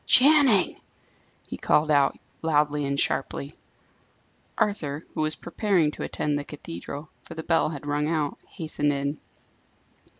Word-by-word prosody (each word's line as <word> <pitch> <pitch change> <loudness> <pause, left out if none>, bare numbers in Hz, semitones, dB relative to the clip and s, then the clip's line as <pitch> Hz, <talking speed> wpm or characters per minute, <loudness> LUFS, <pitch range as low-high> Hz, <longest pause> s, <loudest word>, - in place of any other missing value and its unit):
"Channing!" 265 - +6 0.7
he - - -6
called 155 +1 +2
out, 140 -2 +3 0.2
loudly 150 -2 +2
and 140 0 -1
sharply. 140 +1 -1 1.0
Arthur, 155 -8 -1
who - - -2
was 155 0 0
preparing 175 -4 +1
to - - -9
attend 145 -1 -1
the - - -4
cathedral, 145 - -8
for - - -11
the 160 - -5
bell 165 -2 +2
had 145 -2 -7
rung 145 +1 0
out, 155 -3 -1
hastened 155 -4 -1
in. 140 +1 -2
150 Hz, 135 wpm, -26 LUFS, 145-165 Hz, 1.0 s, Channing